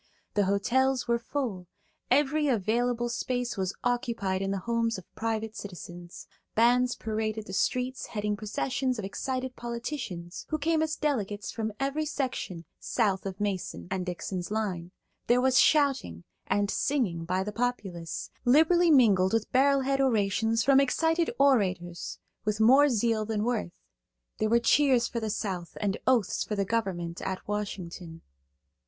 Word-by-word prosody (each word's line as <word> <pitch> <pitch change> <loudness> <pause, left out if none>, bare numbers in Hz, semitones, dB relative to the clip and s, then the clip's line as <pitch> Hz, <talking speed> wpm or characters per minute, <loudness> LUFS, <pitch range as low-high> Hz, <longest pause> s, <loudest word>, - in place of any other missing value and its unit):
The 205 -1 +2
hotels 250 +7 +1
were 235 0 +2
full; 230 -8 -4 0.4
every 295 +3 +3
available 240 +1 +1
space 245 0 -2
was 190 -2 -2
occupied 235 -6 -1
in 195 - -1
the 195 - -1
homes 230 -1 0
of 185 - -10
private 225 -1 -3
citizens. 175 -2 -9 0.3
Bands 245 +2 +4
paraded 220 0 -3
the 190 - -8
streets 250 +5 -1
heading 210 -1 -2
processions 250 +5 -2
of 210 - -4
excited 255 +4 -3
politicians 235 - -5
who 310 - 0
came 315 +1 +1
as 315 0 0
delegates 210 -10 -2
from 220 -1 -3
every 280 +3 -1
section 255 - -3
south 200 -5 0
of 190 -1 -6
Mason 200 -4 -3
and 190 -1 -1
Dixon's 180 0 -4
line; 195 -6 -2 0.4
there 245 +1 +4
was 260 +1 +4
shouting 275 - +2 0.2
and 200 +1 +1
singing 235 -13 0
by 185 +3 -1
the 210 - -4
populace, 205 -8 -3
liberally 320 +7 +5
mingled 205 - +5
with 225 -1 0
barrelhead 275 +1 +3
orations 225 -2 +2
from 275 +1 +5
excited 325 +5 +2
orators 190 -11 +1 0.3
with 210 0 -1
more 265 +6 +6
zeal 225 -2 +1
than 215 -1 -2
worth; 225 -7 -2 0.6
there 215 - +1
were 235 - +5
cheers 250 0 +4
for 235 - -3
the 220 -1 -3
South 185 -5 -4
and 200 -2 0
oaths 245 -7 +2
for 210 - -3
the 200 -1 0
government 185 -6 -2
at 190 0 -4
Washington. 180 -5 -5
225 Hz, 150 wpm, -28 LUFS, 195-255 Hz, 0.6 s, more